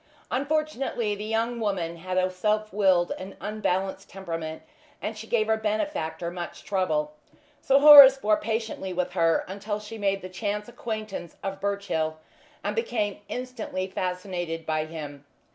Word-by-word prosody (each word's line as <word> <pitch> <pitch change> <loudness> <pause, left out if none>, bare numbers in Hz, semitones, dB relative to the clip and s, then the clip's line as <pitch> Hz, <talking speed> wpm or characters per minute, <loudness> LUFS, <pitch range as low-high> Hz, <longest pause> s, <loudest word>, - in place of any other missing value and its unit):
Unfortunately 275 -6 -1
the 205 +1 -5
young 225 +2 -1
woman 180 -6 -2
had 185 +2 -4
a 185 0 +2
self 215 +2 0
willed 190 -4 +3
and 190 +1 -8
unbalanced 195 -3 -2
temperament, 165 -4 -5 0.4
and 215 - -4
she 220 +1 -9
gave 220 -2 +2
her 220 0 +2
benefactor 210 - -2
much 175 -1 -7
trouble. 155 -6 0 0.5
Sir 270 - +4
Horace 280 -2 +11
bore 215 -4 +2
patiently 220 -4 -3
with 180 0 -1
her 165 -2 +2
until 205 +2 -4
she 215 +1 -9
made 195 -1 0
the - - -5
chance 205 +2 -3
acquaintance 215 -7 -6
of 195 0 -4
Birchill, 200 -6 -1 0.5
and 205 +1 -2
became 225 -3 -1
instantly 250 -7 -4
fascinated 180 -3 -3
by 155 -1 0
him. 145 -3 -8
200 Hz, 145 wpm, -26 LUFS, 180-220 Hz, 0.5 s, Horace